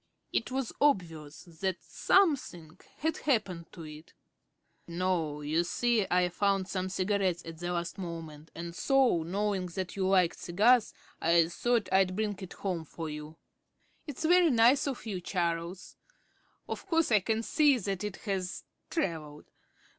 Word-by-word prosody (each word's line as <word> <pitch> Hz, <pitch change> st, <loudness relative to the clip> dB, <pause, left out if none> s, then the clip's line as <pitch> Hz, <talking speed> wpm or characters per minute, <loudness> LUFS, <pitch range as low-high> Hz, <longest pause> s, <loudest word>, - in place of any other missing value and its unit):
It 230 Hz, -, 0 dB
was 260 Hz, -2 st, -3 dB
obvious 165 Hz, -, 0 dB
that 180 Hz, +2 st, -4 dB
something 220 Hz, -, +1 dB, 0.2 s
had 320 Hz, 0 st, -1 dB
happened 195 Hz, -, -1 dB
to 170 Hz, -, -9 dB
it. 155 Hz, +1 st, -11 dB, 0.7 s
"No, 170 Hz, -4 st, -1 dB
you 155 Hz, +3 st, +1 dB
see, 230 Hz, +3 st, +1 dB
I 180 Hz, 0 st, +3 dB
found 195 Hz, +1 st, +1 dB
some 185 Hz, -1 st, -2 dB
cigarettes 190 Hz, -2 st, 0 dB
at 165 Hz, -1 st, -8 dB
the 175 Hz, 0 st, -3 dB
last 175 Hz, +3 st, -3 dB
moment, 165 Hz, -4 st, -7 dB
and 170 Hz, 0 st, -6 dB
so, 265 Hz, -, +3 dB
knowing 190 Hz, +2 st, -1 dB
that 180 Hz, +1 st, -5 dB
you 190 Hz, -1 st, 0 dB
liked 185 Hz, -3 st, +3 dB
cigars, 220 Hz, +7 st, +3 dB, 0.3 s
I 165 Hz, 0 st, +4 dB
thought 235 Hz, +4 st, 0 dB
I'd 190 Hz, -1 st, +3 dB
bring 210 Hz, 0 st, -1 dB
it 190 Hz, -3 st, -8 dB
home 180 Hz, -4 st, -3 dB
for 160 Hz, 0 st, -6 dB
you." 150 Hz, +1 st, -8 dB, 0.7 s
"It's 295 Hz, +2 st, -4 dB
very 350 Hz, 0 st, +5 dB
nice 250 Hz, +3 st, +4 dB
of 265 Hz, -4 st, -4 dB
you, 195 Hz, -5 st, -4 dB
Charles. 170 Hz, 0 st, -3 dB, 0.7 s
Of -, -, -6 dB
course 330 Hz, -6 st, +2 dB
I 215 Hz, -, +6 dB
can 220 Hz, +3 st, -1 dB
see 290 Hz, +2 st, +4 dB
that 195 Hz, -3 st, -3 dB
it 210 Hz, -2 st, -3 dB
has 190 Hz, -3 st, -3 dB, 0.3 s
travelled. 160 Hz, -, -3 dB
185 Hz, 150 wpm, -30 LUFS, 170-225 Hz, 0.7 s, I